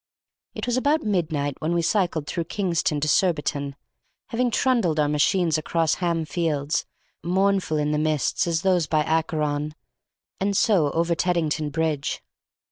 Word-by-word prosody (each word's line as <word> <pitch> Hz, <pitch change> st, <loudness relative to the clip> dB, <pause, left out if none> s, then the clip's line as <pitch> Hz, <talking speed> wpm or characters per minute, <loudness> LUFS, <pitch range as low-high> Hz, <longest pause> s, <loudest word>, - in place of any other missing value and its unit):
It -, -, -4 dB
was 245 Hz, 0 st, 0 dB
about 290 Hz, +4 st, +2 dB
midnight 160 Hz, -8 st, -1 dB
when 160 Hz, +2 st, 0 dB
we 170 Hz, -, +1 dB
cycled 175 Hz, -5 st, 0 dB
through 170 Hz, +2 st, -3 dB
Kingston 170 Hz, -5 st, -1 dB
to 155 Hz, -, 0 dB
Surbiton, 150 Hz, -4 st, +1 dB, 0.5 s
having 245 Hz, +1 st, +1 dB
trundled 225 Hz, -10 st, +1 dB
our 150 Hz, -, +3 dB
machines 155 Hz, +2 st, +2 dB
across 165 Hz, 0 st, 0 dB
Ham 170 Hz, -2 st, 0 dB
Fields, 155 Hz, -3 st, -1 dB, 0.4 s
mournful 190 Hz, -2 st, +1 dB
in 150 Hz, 0 st, 0 dB
the 150 Hz, -, +1 dB
mist 155 Hz, +1 st, 0 dB
as 165 Hz, -1 st, 0 dB
those 180 Hz, -4 st, +2 dB
by 155 Hz, -1 st, +2 dB
Acheron, 150 Hz, -2 st, -1 dB, 0.6 s
and 195 Hz, 0 st, 0 dB
so 185 Hz, -10 st, +3 dB
over 170 Hz, +1 st, +1 dB
Teddington 165 Hz, -4 st, 0 dB
Bridge. 155 Hz, -2 st, -2 dB
165 Hz, 145 wpm, -24 LUFS, 150-185 Hz, 0.6 s, our